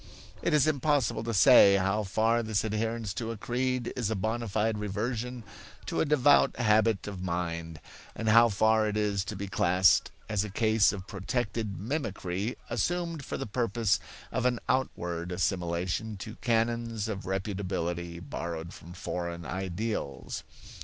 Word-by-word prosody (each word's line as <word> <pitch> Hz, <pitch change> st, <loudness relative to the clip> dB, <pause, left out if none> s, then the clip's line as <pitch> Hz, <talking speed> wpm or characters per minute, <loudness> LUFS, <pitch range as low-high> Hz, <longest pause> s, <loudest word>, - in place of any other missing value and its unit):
It -, -, 0 dB
is 150 Hz, -3 st, +4 dB
impossible 145 Hz, -4 st, +1 dB
to 115 Hz, -, -1 dB
say 105 Hz, -2 st, +7 dB
how 95 Hz, +2 st, +1 dB
far 110 Hz, +4 st, +1 dB
this 110 Hz, -3 st, 0 dB
adherence 110 Hz, -1 st, -2 dB
to 115 Hz, +3 st, -4 dB
a 115 Hz, -, -4 dB
creed 125 Hz, +1 st, -1 dB
is 120 Hz, -5 st, -1 dB
a 110 Hz, -, 0 dB
bona 115 Hz, +4 st, -2 dB
fide 110 Hz, +1 st, 0 dB
reversion 115 Hz, +4 st, -3 dB, 0.4 s
to -, -, -1 dB
a -, -, +2 dB
devout 145 Hz, -1 st, +4 dB
habit 110 Hz, -3 st, +3 dB
of 100 Hz, -3 st, -6 dB
mind, 85 Hz, -3 st, -3 dB, 0.4 s
and 110 Hz, -, -4 dB
how 115 Hz, +2 st, +7 dB
far 110 Hz, +1 st, +3 dB
it 105 Hz, 0 st, -1 dB
is 100 Hz, -2 st, +1 dB
to 105 Hz, +1 st, -5 dB
be 100 Hz, +1 st, -5 dB
classed 90 Hz, 0 st, +4 dB, 0.2 s
as 105 Hz, -2 st, 0 dB
a 105 Hz, -, -5 dB
case 110 Hz, +1 st, +3 dB
of 95 Hz, -3 st, -6 dB
protective 105 Hz, +1 st, -3 dB
mimicry 105 Hz, -, -3 dB
assumed 165 Hz, -, -1 dB
for -, -, -4 dB
the -, -, -4 dB
purpose 115 Hz, -2 st, +1 dB, 0.3 s
of 125 Hz, -1 st, +1 dB
an 120 Hz, -2 st, 0 dB
outward 90 Hz, -9 st, -1 dB
assimilation 90 Hz, +3 st, -1 dB
to 105 Hz, +3 st, -7 dB
canons 115 Hz, -2 st, 0 dB
of 100 Hz, -3 st, -4 dB
reputability 90 Hz, -3 st, -3 dB
borrowed 85 Hz, +2 st, -5 dB
from 85 Hz, -, -11 dB
foreign 85 Hz, -1 st, -4 dB
ideals. 95 Hz, -, -4 dB
105 Hz, 155 wpm, -29 LUFS, 95-115 Hz, 0.4 s, say